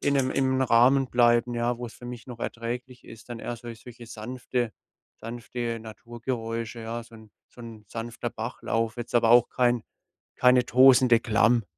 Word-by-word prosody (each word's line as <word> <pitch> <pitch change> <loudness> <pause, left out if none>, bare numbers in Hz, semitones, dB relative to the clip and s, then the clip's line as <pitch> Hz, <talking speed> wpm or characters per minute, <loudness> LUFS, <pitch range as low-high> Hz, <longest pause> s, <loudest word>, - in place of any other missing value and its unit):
in 140 - +1
'nem 135 -2 +1
im 130 -1 +1
Rahmen 130 +2 +4
bleiben, 120 0 +3
ja, 120 0 -1
wo's 120 -2 -7
für 120 - -14
mich 120 -2 -8
noch 120 -2 -10
erträglich 125 +2 -5
ist, 115 +2 -13
dann 120 - -5
eher 120 - -5
sol 120 0 -9
solche 120 0 -13
sanfte 120 +1 -4 0.4
sanfte 115 0 -5
Naturgeräusche, 115 0 -5
ja, 115 +1 -5
so 115 - -17
'n 110 -2 -15 0.2
so 125 - -16
'n 110 -2 -11
sanfter 115 +2 -5
Bachlauf, 115 0 -3
jetzt 120 0 -7
aber 115 -1 +4
auch 120 0 +6
kein 120 -2 +1 0.5
keine 125 0 +5
tosende 125 -2 +6
Klamm. 115 +1 +2
120 Hz, 170 wpm, -26 LUFS, 115-125 Hz, 0.5 s, auch